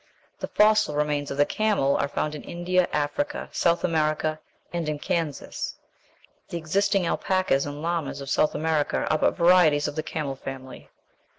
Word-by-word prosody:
The - - -3
fossil 215 -7 +3
remains 150 -1 0
of 140 - -4
the 145 - +5
camel 205 -11 +1
are - - +1
found 150 +1 -2
in 150 - -6
India, 180 +1 0
Africa, 285 - -2
South 170 0 +1
America, 155 -1 0 0.3
and 170 -3 -2
in 150 - -2
Kansas. 165 -3 -3 0.7
The 170 - -3
existing 195 +4 +1
alpacas 185 -6 +1
and 145 +1 -6
llamas 165 -5 -2
of 140 - -7
South 155 - +2
America 155 -1 0
are 155 - +3
but - - +2
varieties 170 -4 +5
of - - -5
the 155 - -1
camel 150 -4 -4
family. 130 -1 -9
155 Hz, 165 wpm, -25 LUFS, 145-175 Hz, 0.7 s, the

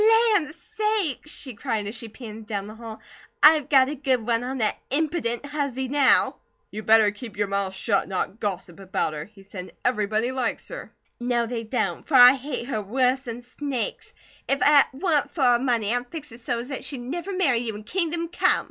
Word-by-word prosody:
"Land 315 -7 +1 0.3
sakes!" 420 - 0
she 265 -4 -5
cried 220 -2 -2
as 205 - -5
she 230 -1 -7
panted 220 -1 -10
down 200 -2 -3
the 210 - -9
hall. 225 -1 -9 0.4
"I've 300 -2 +7
got 265 -2 +6
a 290 - -3
good 260 -5 0
one 235 0 +1
on 260 +2 -3
that 215 -4 +1
impident 285 -4 -1
huzzy 280 -3 -3
now!" 280 -1 +3 0.3
"You 215 - -5
better 220 -1 +5
keep 210 0 -10
your 205 - +1
mouth 195 -1 -2
shut, 200 0 +1
and - - -14
not 195 +3 -3
gossip 185 -3 -4
about 190 -4 -2
her," 150 0 -5
he 200 -2 -18
said. 185 -2 -9
"Everyone 220 0 +1
likes 255 -3 -2
her!" - - -8 0.3
"No, 240 -1 0
they 230 0 -4
don't, 215 -7 -2
for 300 - 0
I 250 0 +10
hate 270 -2 -4
her 230 -5 -2
worse 255 +5 0
'n 235 +1 -6
snakes! 255 0 -5 0.3
If 275 - +2
it 290 -1 +7
wa'n't 290 -1 0
for 295 - 0
her 245 -1 +5
money 235 -4 +1
I'd 245 0 -2
fix 300 -4 -8
her 230 - -11
so's 240 +2 -3
'at 270 - -3
she'd 280 - -3
never 335 +10 -5
marry 345 -11 +2
you 230 -3 -4
in 210 - -8
kingdom 335 - -2
come." - - +2
245 Hz, 205 wpm, -25 LUFS, 215-280 Hz, 0.4 s, I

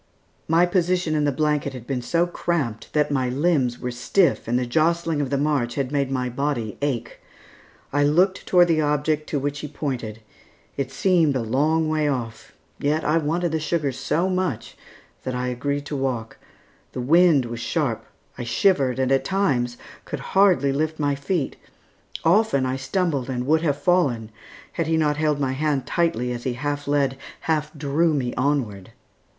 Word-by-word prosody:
My 165 +2 +4
position 180 -2 +1
in 150 -1 +1
the 145 - +2
blanket 150 -1 0
had 125 -3 -9
been 130 -2 -2
so 170 +8 +1
cramped 160 -10 -2
that 150 -1 +2
my 130 -3 +1
limbs 135 -3 +1
were 125 - -4
stiff 125 +10 +1
and 120 +1 +1
the 125 - 0
jostling 160 +3 +1
of 140 - -2
the 140 - 0
march 140 -5 0
had 135 -2 -2
made 140 -2 0
my 130 -2 -1
body 125 -4 -2
ache. 120 -5 -2 0.7
I 145 0 +3
looked 180 +6 +2
toward 175 -1 +5
the 160 -1 +3
object 150 +1 0
to 150 - -1
which 145 +1 -2
he 150 - -5
pointed. 125 -7 -4 0.5
It 135 -2 -2
seemed 165 -4 +2
a 125 - 0
long 155 +7 +1
way 155 -1 +1
off; 115 -5 -4 0.3
yet 150 +2 0
I 155 +2 +3
wanted 165 +3 -1
the 160 - 0
sugar 155 -2 -1
so 165 +7 -1
much 185 -1 -2 0.5
that 130 -1 -4
I 125 0 -1
agreed 140 +3 -2
to 145 - -4
walk. 130 -5 -3 0.5
The - - -5
wind 160 0 +4
was 120 0 -6
sharp. - - -1 0.4
I - - -3
shivered, 130 +1 +2
and 130 0 0
at 135 - +3
times 130 -12 0 0.3
could - - -5
hardly 190 -8 +4
lift 155 +2 -1
my 145 -1 +1
feet; 140 +2 -2 0.7
often 170 -6 +3
I 130 0 -1
stumbled 140 -1 -1
and 125 -1 -2
would 160 +3 +3
have 145 -4 0
fallen 140 -9 +1 0.4
had 165 - -2
he 160 0 +2
not 150 -2 +1
held 150 -2 +1
my 135 -2 0
hand 140 -1 -1
tightly, 125 -8 0
as 120 -1 -4
he 130 - -1
half 145 +2 -3
led, 140 -2 +1 0.2
half 155 -2 -1
drew 150 +3 +1
me 125 -4 -1
onward. 125 -9 -1
145 Hz, 180 wpm, -23 LUFS, 130-160 Hz, 0.7 s, toward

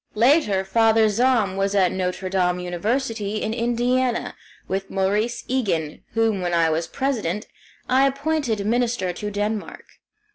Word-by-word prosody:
Later 220 -5 +3
Father 225 +2 +4
Zahm 220 -3 +2
was 195 +1 0
at 185 -3 +3
Notre 185 0 -2
Dame 180 -1 +1
University, 210 +4 -2
in 220 - -1
Indiana, 240 +1 0 0.3
with 195 0 -3
Maurice 210 +5 0
Egan, 185 - -1
whom, 225 -4 +1
when 175 -1 0
I 165 -1 +3
was 165 +1 -1
President, 215 -5 -2 0.4
I 265 +2 +4
appointed 275 -6 -1
minister 230 -5 0
to 210 +4 -5
Denmark. 210 +1 -3
210 Hz, 135 wpm, -23 LUFS, 190-240 Hz, 0.4 s, Father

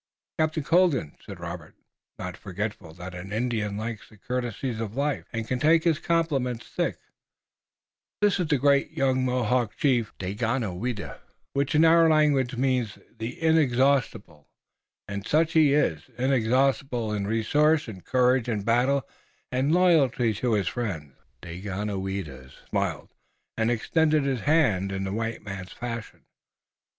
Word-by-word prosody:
"Captain 155 -1 +1
Colden," 165 - +2
said - - -9
Robert, - - -7 0.4
not - - -5
forgetful 100 -2 -5
that 90 +1 -8
an 90 +2 -8
Indian 110 -2 -1
likes 110 0 -5
the 110 - -18
courtesies 120 +1 -3
of 110 -1 -4
life, 145 +1 -1
and 115 -2 -4
can 130 +1 -1
take 160 +3 +4
his 165 -4 +2
compliments 140 -8 0
thick, - - -2 1.2
"this 205 -2 +2
is 180 - 0
the 150 -2 +2
great 140 +1 +3
young 130 -1 +1
Mohawk 125 -2 0
Chief, 120 -6 +1
Daganoweda, 105 +1 -3 0.3
which 140 +2 0
in 155 +2 +6
our 165 0 +6
language 145 -5 +2
means 125 -4 0 0.2
'The 120 +8 -5
Inexhaustible' 130 - +1 0.6
and 100 +1 -5
such 160 +2 +2
he 150 -3 +5
is, 80 - 0
inexhaustible 130 -2 +1
in 100 -1 -2
resource 145 +8 +2
and 95 -5 -9
courage 125 -1 +2
in 105 -4 -1
battle, 125 +5 +2 0.4
and 130 +2 0
in 155 - +2
loyalty 140 -10 +3
to 115 +3 -1
his 100 -4 +1
friends." 90 - -3 0.3
Daganoweda 95 -6 -5 0.2
smiled - - -2 0.4
and 110 0 +1
extended 155 +6 +2
his 135 -3 0
hand 110 - +2
in 95 0 -3
the 95 0 -3
white 115 +1 -3
man's 95 -2 -7
fashion. 115 -2 -7
120 Hz, 140 wpm, -26 LUFS, 105-140 Hz, 1.2 s, in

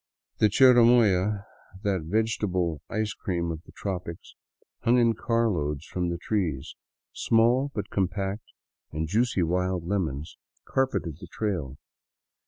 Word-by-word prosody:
The 110 - +5
chirimoya, 110 -5 +5 0.4
that 100 -4 0
vegetable 90 - -1
ice 110 -1 -1
cream 85 -5 -2
of 80 -1 -6
the - - -13
tropics, 90 -4 -6 0.5
hung 120 +2 +3
in 115 -1 +4
car 115 +1 +1
loads 75 -6 -2
from 90 -1 -2
the 85 - -2
trees; 85 -8 -2 0.4
small, 120 +5 +2
but 105 0 -4
compact 95 +2 -2 0.5
and 80 +1 -2
juicy 110 +1 +1
wild 90 +1 0
lemons, 80 -7 -3 0.3
carpeted 130 - -1
the 90 - -10
trail. 85 -9 -3
95 Hz, 125 wpm, -27 LUFS, 85-110 Hz, 0.5 s, The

